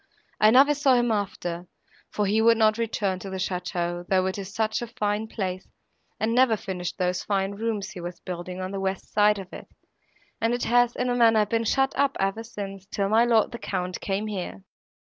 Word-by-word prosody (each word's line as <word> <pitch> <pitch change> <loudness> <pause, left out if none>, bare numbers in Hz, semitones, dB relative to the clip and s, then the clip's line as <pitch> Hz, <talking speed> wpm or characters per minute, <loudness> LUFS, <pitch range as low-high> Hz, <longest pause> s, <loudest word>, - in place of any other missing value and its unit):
I 215 - +6
never 270 +5 +6
saw 280 -3 +3
him 240 -1 +2
after, 180 -4 -3 0.4
for 210 - -1
he 210 +3 +2
would 230 0 +5
not 215 0 +3
return 205 -5 -1
to 195 - -7
the 190 - -4
château, 175 -1 -3
though 185 -1 +2
it 190 +2 -2
is 195 0 -7
such 220 +2 -1
a 240 - -4
fine 215 -2 -2
place, 185 -4 -4 0.5
and 220 +1 0
never 245 -3 +4
finished 180 -3 -5
those 180 -1 -1
fine 195 -1 0
rooms 210 -1 -3
he 185 -4 -8
was 175 0 -7
building 180 0 -6
on 185 0 -4
the 195 - -4
west 190 0 -3
side 210 0 +4
of 190 -2 -9
it, - - -9 0.7
and 230 +1 +2
it 245 - -3
has, 245 0 +3
in 250 0 0
a - - +2
manner, 225 -3 +5
been 230 +2 -1
shut 270 +4 +2
up 280 0 +1
ever 195 +3 0
since, 195 -4 -8
till 200 -1 -1
my 225 +3 +4
lord 230 -1 +3
the 235 - -7
Count 180 0 -3
came 200 +2 -2
here." 180 - -5
205 Hz, 210 wpm, -25 LUFS, 185-230 Hz, 0.7 s, I